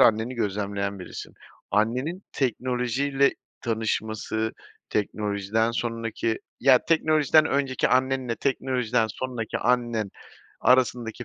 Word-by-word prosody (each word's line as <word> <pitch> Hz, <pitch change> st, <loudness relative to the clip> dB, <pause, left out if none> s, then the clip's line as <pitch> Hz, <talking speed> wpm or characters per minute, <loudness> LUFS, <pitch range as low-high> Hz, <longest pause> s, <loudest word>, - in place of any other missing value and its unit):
anneni 115 Hz, +3 st, +4 dB
gözlemleyen 100 Hz, -2 st, -2 dB
birisin. 90 Hz, -, -8 dB, 0.4 s
Annenin 125 Hz, -, 0 dB
teknolojiyle 130 Hz, +2 st, +1 dB, 0.3 s
tanışması, 110 Hz, -1 st, -1 dB, 0.4 s
teknolojiden 105 Hz, +1 st, 0 dB
sonraki, 115 Hz, -1 st, -2 dB, 0.2 s
ya 130 Hz, -1 st, +7 dB
teknolojiden 155 Hz, -1 st, +4 dB
önceki 135 Hz, -2 st, +1 dB
annenle 130 Hz, -2 st, +1 dB
teknolojiden 125 Hz, -4 st, 0 dB
sonraki 120 Hz, 0 st, -4 dB
annen 120 Hz, -4 st, +1 dB, 0.5 s
arasındaki 125 Hz, -1 st, +2 dB
120 Hz, 85 wpm, -26 LUFS, 110-130 Hz, 0.5 s, ya